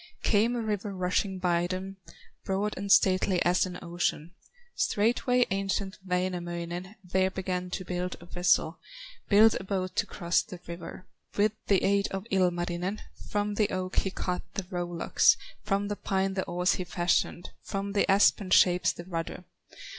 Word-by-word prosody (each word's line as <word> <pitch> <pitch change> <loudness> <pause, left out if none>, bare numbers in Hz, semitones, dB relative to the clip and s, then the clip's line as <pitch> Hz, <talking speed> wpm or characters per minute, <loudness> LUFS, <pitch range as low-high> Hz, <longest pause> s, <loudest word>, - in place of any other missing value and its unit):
Came 225 +3 +3
a 240 - -1
river 210 -2 -3
rushing 185 +1 0
by 175 -1 +1
them, 190 +1 -5 0.5
Broad 200 +2 -1
and 200 +1 -3
stately 185 -1 +4
as 180 +2 +3
an 180 -1 -7
ocean. 170 -1 -2 0.4
Straightway 250 - +2
ancient 195 0 -2
Wainamoinen 180 0 -3
There 190 +1 +1
began 185 -1 -3
to 185 +1 -4
build 180 0 -3
a 170 - -13
vessel, 175 -1 +1 0.5
Build 220 +2 +6
a - - -7
boat 185 -1 -3
to - - +1
cross 170 -2 +1
the 185 -5 -10
river. 170 +2 -8 0.3
With 205 +1 +4 0.2
the 195 -2 +3
aid 200 0 +2
of 195 +1 -5
Ilmarinen, 180 +1 0 0.3
From 205 0 -1
the 205 0 +1
oak 185 0 -3
he 195 - +2
cut 180 -1 -3
the 195 - -2
row 175 -1 -2
locks, 175 - +3 0.2
From 200 0 0
the 205 - -2
pine 195 -1 -1
the 190 -1 -2
oars 180 +2 +1
he - - -1
fashioned, 175 +1 0
From 200 0 -4
the 200 - +2
aspen 195 0 +4
shapes 180 -1 +5
the 175 - -9
rudder. 170 0 -5
185 Hz, 160 wpm, -28 LUFS, 180-200 Hz, 0.5 s, Build